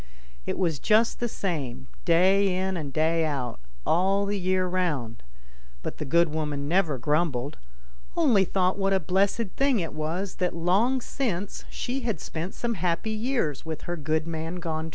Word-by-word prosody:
It - - -1
was 165 -6 +1
just 220 +1 +3
the 240 - 0
same, 135 - -3 0.2
day 185 +2 +4
in 190 0 0
and 150 -5 -4
day 160 +3 +2
out 135 - -2 0.3
all 195 +4 +3
the 200 0 -1
year 185 0 +1
round; 150 -11 -1 0.6
but - - -5
the 150 - -3
good 170 +4 +4
woman 150 -2 -2
never 165 -4 +2
grumbled, 150 0 0 0.6
only 255 - +5
thought 185 +1 +1
what 195 0 +2
a 190 - +4
blessed 195 +4 +1
thing 270 -4 +3
it 165 -3 -3
was 165 +5 -3
that 180 -2 0
long 200 +10 +2
since 205 -8 -3
she 255 +2 -3
had 230 - -2
spent 165 +4 -5
some 240 -1 -1
happy 180 +3 -1
years 220 - -1
with 160 -1 -5
her 175 - -3
good 155 0 0
man 165 +1 -4
gone 160 -2 -3
175 Hz, 170 wpm, -27 LUFS, 155-195 Hz, 0.6 s, only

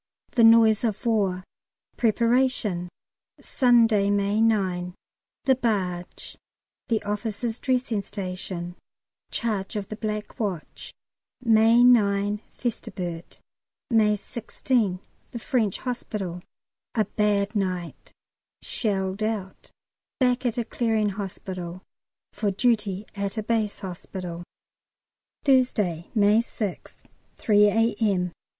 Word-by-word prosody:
The 235 - +3
noise 225 -1 +6
of 225 +1 -2
war 195 -5 +1 0.5
Preparation 230 -5 +1 0.5
Sunday, 230 -6 +3
May 205 +1 +1
9 185 -5 +1 0.5
The 265 - +4
barge 190 -8 -3 0.5
The 225 -4 0
officers' 215 +3 -3
dressing 250 -5 0
station 180 -2 -6 0.5
Charge 210 -4 -1
of 205 -2 -4
the 215 - -4
Black 215 -1 -4
Watch, 195 -8 -4 0.5
May 230 0 +5
9 205 -4 +4
Festubert, 180 -8 -5 0.5
May 215 -2 +4
16 215 -2 -1 0.3
The - - -7
French 230 -5 0
Hospital 205 -8 -4 0.5
A 215 -2 +2
bad 210 0 0
night 185 -4 -3 0.5
Shelled 195 -3 -1
out 215 -3 -3 0.5
Back 250 -1 +2
at 235 - -2
a 240 - -1
Clearing 220 -2 0
Hospital 185 -3 -6 0.5
"For 210 0 -1
duty 210 -2 0
at 200 +1 -3
a 215 - -1
Base 215 -2 -1
Hospital." 180 -2 -6 1.0
Thursday, 215 - +2
May 210 +1 +5
6th, 210 -5 -6 0.4
3 210 -1 +4
A.M. 205 -4 +1
210 Hz, 100 wpm, -25 LUFS, 190-230 Hz, 1.0 s, noise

